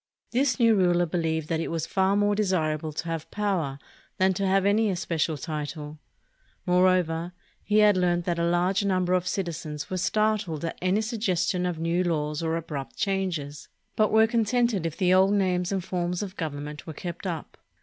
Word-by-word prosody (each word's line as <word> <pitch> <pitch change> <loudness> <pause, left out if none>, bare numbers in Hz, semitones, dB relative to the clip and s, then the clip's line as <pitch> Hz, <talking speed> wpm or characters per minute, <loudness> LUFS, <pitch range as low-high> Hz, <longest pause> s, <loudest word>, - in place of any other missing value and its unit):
This 265 +2 +1
new 230 -2 +5
ruler 175 -3 +3
believed 160 -2 -1
that 160 - 0
it 165 - -2
was 165 -1 -2
far 190 +3 +1
more 205 0 +2
desirable 160 -7 0
to 150 - -5
have 165 -2 -4
power 185 -10 -1 0.4
than 190 0 +3
to 195 +1 -1
have 195 0 +2
any 210 +2 +3
especial 165 -4 -1
title. 150 +1 -5 0.7
More 180 +1 +4
over, 175 -1 0 0.3
he 210 - +1
had 210 -2 +6
learned 175 -1 +1
that 170 -1 -1
a - - +1
large 175 +3 +2
number 185 -2 +1
of 180 0 +1
citizens 165 -6 -4
were 185 - -1
startled 210 -5 0
at 165 - -5
any 185 +4 +2
suggestion 195 -5 0
of 175 -2 -3
new 165 +2 0
laws 150 -3 -1
or 165 0 0
abrupt 150 -5 -6
changes, 170 -8 -2 0.3
but 215 -1 +2
were 220 0 +6
contented 230 -4 +1
if 165 - -7
the 185 -1 +3
old 190 +2 +5
names 185 -2 +1
and 190 -2 -1
forms 180 0 -2
of 190 -1 -7
gov 155 -6 -3
ernment 150 +2 -7
were 160 - -5
kept 175 +4 -6
up. 165 -4 -5
180 Hz, 190 wpm, -26 LUFS, 165-195 Hz, 0.7 s, had